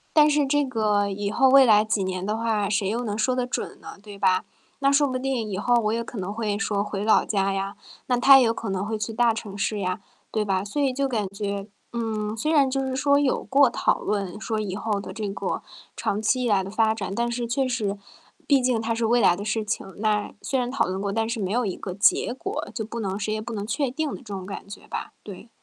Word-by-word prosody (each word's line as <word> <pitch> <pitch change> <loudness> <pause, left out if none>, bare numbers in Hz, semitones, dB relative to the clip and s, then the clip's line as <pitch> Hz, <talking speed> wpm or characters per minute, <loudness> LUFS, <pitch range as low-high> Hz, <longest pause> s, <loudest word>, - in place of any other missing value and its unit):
但 300 0 +7
是 295 -1 +3
这 290 +1 +2
个 210 -5 +1
以 200 +1 -3
后 265 +3 +4
未 270 0 +8
来 210 -2 +6
几 210 -2 0
年 185 0 -3
的 210 +2 -1
话， 220 -3 0
谁 200 -2 +1
又 235 +4 -1
能 210 -2 -3
说 255 +3 +1
的 250 -1 -1
准 - - -4
呢， - - -10
对 205 -1 -10
吧？ 185 -1 +2 0.4
那 275 0 +3
说 285 0 +4
不 255 -1 -2
定， 255 -4 -2
以 190 - -3
后 245 +4 +1
我 215 -2 +2
也 235 0 -1
可 230 -2 -7
能 190 +2 -3
会 210 -2 -2
说 205 -2 0
回 205 -1 -4
老 220 - +4
家 195 -2 +1
呀， 195 +1 -3 0.3
那 250 - +1
他 270 +2 +8
也 255 - +5
有 225 - +2
可 225 - -5
能 195 +1 -1
会 220 0 -2
去 215 +1 -3
大 235 0 +3
城 205 -3 -7
市 210 +1 -1
呀， 185 0 -2 0.3
对 215 -1 0
吧？ 190 -1 0
所 205 +8 -4
以 270 -2 +2
就 275 +1 0
感 215 -6 -1
觉 200 0 -4 0.3
嗯， 220 -2 -2
虽 305 +8 0
然 280 -4 +4
就 270 0 -1
是 260 0 -2
说 280 +1 +3
有 280 -3 +1
过 275 -2 +4
讨 - - +1
论 200 -1 -2
说 220 -1 -2
以 195 -3 -3
后 210 -1 -1
的 - - -7
这 215 -2 -4
个 195 - -3 0.3
长 205 +2 -1
期 250 +3 +1
以 - - +1
来 195 -2 +3
的 190 - -6
发 220 +1 +2
展， 200 -2 -4
但 235 0 0
是 235 0 -2
确 260 +3 0
实， 210 -5 -1 0.5
毕 275 -3 +4
竟 250 -2 +1
它 225 +1 -1
是 230 0 -1
未 240 +1 +4
来 175 -5 +5
的 200 - -6
事 215 +1 -1
情。 195 -2 -4
那 210 -1 0
虽 265 - 0
然 245 0 -1
讨 275 - +1
论 190 +1 -3
过， 200 -1 -1
但 225 +1 0
是 230 -1 -3
没 190 -2 -2
有 245 0 +1
一 190 - -2
个 185 - -6
结 210 +3 +3
果， 255 - -4
就 220 -3 -2
不 230 +1 -6
能 195 -1 -2
谁 215 +1 -1
也 215 - -2
不 235 +2 -7
能 205 -1 -3
确 275 +3 -1
定 300 +3 -2
的 - - -5
这 - - -16
种 195 -3 -6
感 200 0 -8
觉 205 - -10
吧， - - -5
对。 210 +3 -10
220 Hz, 285 characters per minute, -25 LUFS, 200-245 Hz, 0.5 s, 未